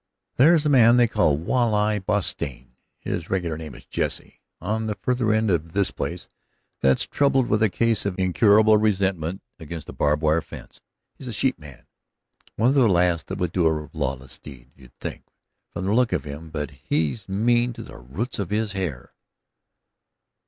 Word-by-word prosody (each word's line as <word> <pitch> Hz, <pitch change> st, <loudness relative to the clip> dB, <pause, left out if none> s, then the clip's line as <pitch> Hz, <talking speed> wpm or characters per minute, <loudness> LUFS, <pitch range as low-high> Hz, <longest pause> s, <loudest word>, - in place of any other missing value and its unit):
"There's 155 Hz, +3 st, +5 dB
a -, -, +3 dB
man 120 Hz, -3 st, +6 dB
they 120 Hz, -1 st, +5 dB
call 90 Hz, -10 st, +2 dB
Walleye 105 Hz, -, +1 dB
Bostian 85 Hz, -11 st, -2 dB, 0.3 s
his 85 Hz, -2 st, -5 dB
regular 90 Hz, -4 st, -1 dB
name 80 Hz, -3 st, -8 dB
is -, -, -14 dB
Jesse -, -, -3 dB, 0.2 s
on 110 Hz, +1 st, -2 dB
the 105 Hz, -, -2 dB
farther 120 Hz, +2 st, 0 dB
end 110 Hz, -1 st, +2 dB
of 85 Hz, -1 st, -1 dB
this 100 Hz, -1 st, +1 dB
place -, -, -5 dB, 0.5 s
that's 65 Hz, -1 st, +2 dB
troubled 135 Hz, -2 st, +2 dB
with 105 Hz, 0 st, +1 dB
a 110 Hz, -, +4 dB
case 115 Hz, +3 st, +1 dB
of 100 Hz, -2 st, -3 dB
incurable 105 Hz, +3 st, +4 dB
resentment 95 Hz, -4 st, 0 dB, 0.2 s
against 80 Hz, 0 st, -8 dB
a -, -, -7 dB
barbed 75 Hz, +1 st, 0 dB
wire 80 Hz, +2 st, +3 dB
fence. -, -, -12 dB, 0.4 s
He's 130 Hz, -, -9 dB
a -, -, -4 dB
sheepman, 80 Hz, -, -3 dB, 0.7 s
one 115 Hz, +3 st, +3 dB
of -, -, +3 dB
the 135 Hz, -5 st, +4 dB
last 90 Hz, -2 st, +2 dB
that -, -, -5 dB
would 90 Hz, -2 st, -1 dB
do 85 Hz, -2 st, +2 dB
a 75 Hz, -2 st, -1 dB
lawless 65 Hz, 0 st, -3 dB
deed, 65 Hz, -3 st, -13 dB
you'd 65 Hz, -3 st, -19 dB
think, -, -, -6 dB, 0.5 s
from 90 Hz, -, -5 dB
the 100 Hz, -, +1 dB
look 120 Hz, -3 st, +2 dB
of 80 Hz, -7 st, 0 dB
him, 75 Hz, +2 st, -8 dB
but 75 Hz, -2 st, -4 dB
he's 75 Hz, -, -2 dB
mean 120 Hz, +5 st, +2 dB
to -, -, -8 dB
the -, -, -12 dB
roots 80 Hz, -, -5 dB
of 100 Hz, -4 st, -3 dB
his 110 Hz, 0 st, -1 dB
hair." 90 Hz, -11 st, -5 dB
95 Hz, 180 wpm, -24 LUFS, 80-110 Hz, 0.7 s, man